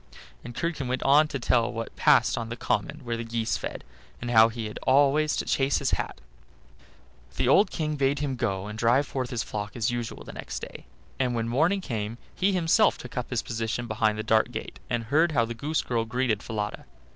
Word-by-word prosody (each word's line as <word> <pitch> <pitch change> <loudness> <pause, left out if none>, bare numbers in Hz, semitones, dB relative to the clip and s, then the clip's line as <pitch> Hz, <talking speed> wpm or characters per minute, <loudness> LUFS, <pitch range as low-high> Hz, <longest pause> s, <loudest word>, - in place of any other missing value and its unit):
'" - - -23
And 120 0 -9
Curdken 165 -6 -2
went 130 +1 -1
on 150 +3 +5
to 140 - -3
tell 120 -2 +2
what 115 -1 -6
passed - - +4
on 115 -1 -4
the 120 - -4
common 150 +4 -2
where 120 -1 -2
the 115 - -4
geese 115 -4 -1
fed, 70 - -5 0.4
and 120 0 -4
how 110 -1 +7
he 115 -1 -5
had 105 - -6
always 145 +3 +3
to - - -2
chase 135 0 +2
his - - -1
hat. - - -2 1.2
The - - 0
old 195 +9 +5
King 155 -2 -2
bade 140 0 +2
him 140 -2 -2
go 100 -6 -2
and 105 +1 -7
drive 120 +5 +3
forth 130 -3 -3
his 115 -3 -2
flock 105 0 -5
as 115 -1 0
usual 120 -1 -4
next - - -6
day; - - -9 0.3
and 125 -2 +1
when 115 0 -1
morning 160 +11 +2
came 110 - -4 0.2
he 195 +2 +1
himself 170 -4 +3
took 125 - -10
up 125 -1 -3
his 125 -3 -1
position 115 +1 -3
behind 110 -1 +1
the 110 - -3
dark 110 0 +3
gate, - - -6
and 120 -1 -1
heard 155 +7 +2
how 120 -5 +3
the 120 - -5
goose 150 +7 -1
girl 115 -2 0
greeted 115 -2 0
Falada. 105 - -4
120 Hz, 215 wpm, -27 LUFS, 115-140 Hz, 1.2 s, how